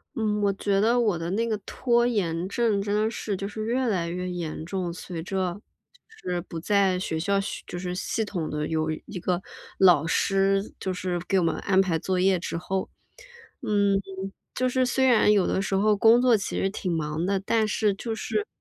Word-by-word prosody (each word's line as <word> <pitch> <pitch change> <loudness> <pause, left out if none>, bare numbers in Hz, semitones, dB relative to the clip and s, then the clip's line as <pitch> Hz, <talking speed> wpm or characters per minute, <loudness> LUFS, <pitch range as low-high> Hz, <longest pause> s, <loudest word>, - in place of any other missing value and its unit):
嗯， 210 -2 0
我 200 -1 +3
觉 195 0 0
得 235 +3 +3
我 210 -7 +2
的 165 +1 -3
那 230 +4 0
个 220 - 0
拖 240 -2 +1
延 180 -7 0
症， 220 -2 +1
真 205 +1 -2
的 215 +1 +2
是 205 -5 -3
就 200 - -4
是 215 +1 -5
越 250 +2 0
来 175 -6 0
越 180 +1 -3
严 165 -3 -4
重。 180 0 -3
随 170 -1 -6
着 185 0 -2 0.7
就 - - -5
是 175 -1 -1
不 170 -1 -7
在 195 +1 +2
学 170 -4 -2
校 200 +5 0 0.3
就 - - -6
是 180 0 -4
系 215 +4 -2
统 175 -6 -3
地 150 0 -2
有 155 -1 -1 0.2
一 185 - -7
个 180 0 -1 0.4
老 175 -5 +5
师， 195 +3 +1
就 190 - -2
是 180 -1 -2
给 195 - +2
我 - - +1
们 165 - +1
安 190 -1 +2
排 180 -4 +2
作 185 +2 -1
业 185 0 +3
之 170 - -4
后， 190 +2 -3 0.7
嗯， 200 -2 +2 0.5
就 255 - +1
是 255 +1 +1
虽 265 +1 +2
然 235 -4 +5
有 205 -3 +4
的 - - 0
时 195 - -1
候， 210 +2 +3
工 225 +3 +6
作 250 -2 +5
其 200 - -2
实 195 - +1
挺 190 -3 -3
忙 155 -1 -2
的， 195 +1 +1
但 215 +3 +1
是 210 0 +1
就 225 +3 -4
是 420 - -2
195 Hz, 225 characters per minute, -26 LUFS, 180-215 Hz, 0.7 s, 工